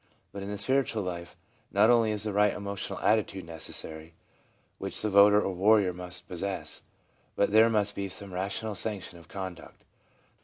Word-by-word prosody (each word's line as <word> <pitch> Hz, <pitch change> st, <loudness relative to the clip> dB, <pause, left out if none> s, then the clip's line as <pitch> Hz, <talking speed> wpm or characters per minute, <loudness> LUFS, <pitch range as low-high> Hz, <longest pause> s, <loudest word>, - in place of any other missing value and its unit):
But 100 Hz, -, -7 dB
in 100 Hz, -, -5 dB
the 105 Hz, -, -4 dB
spiritual 120 Hz, -1 st, +2 dB
life, 85 Hz, -1 st, -6 dB, 0.3 s
not 105 Hz, +3 st, +5 dB
only 115 Hz, -2 st, +4 dB
is 105 Hz, -1 st, 0 dB
the 105 Hz, -2 st, -2 dB
right 105 Hz, 0 st, +3 dB
emotional 100 Hz, -1 st, -5 dB
attitude 105 Hz, -4 st, +1 dB
necessary, 80 Hz, 0 st, -6 dB, 0.6 s
which -, -, -2 dB
the 110 Hz, -, 0 dB
voter 100 Hz, +1 st, +7 dB
or 95 Hz, -2 st, -1 dB
warrior 100 Hz, 0 st, +4 dB
must 90 Hz, 0 st, -6 dB
possess, 95 Hz, +2 st, -4 dB, 0.5 s
but 100 Hz, -, +2 dB
there 110 Hz, +2 st, +6 dB
must 105 Hz, -2 st, +1 dB
be 100 Hz, -1 st, -4 dB
some 100 Hz, 0 st, -7 dB
rational 100 Hz, +4 st, -3 dB
sanction 100 Hz, -4 st, -4 dB
of 85 Hz, -, -17 dB
conduct. 95 Hz, -4 st, -8 dB
100 Hz, 165 wpm, -29 LUFS, 90-105 Hz, 0.6 s, voter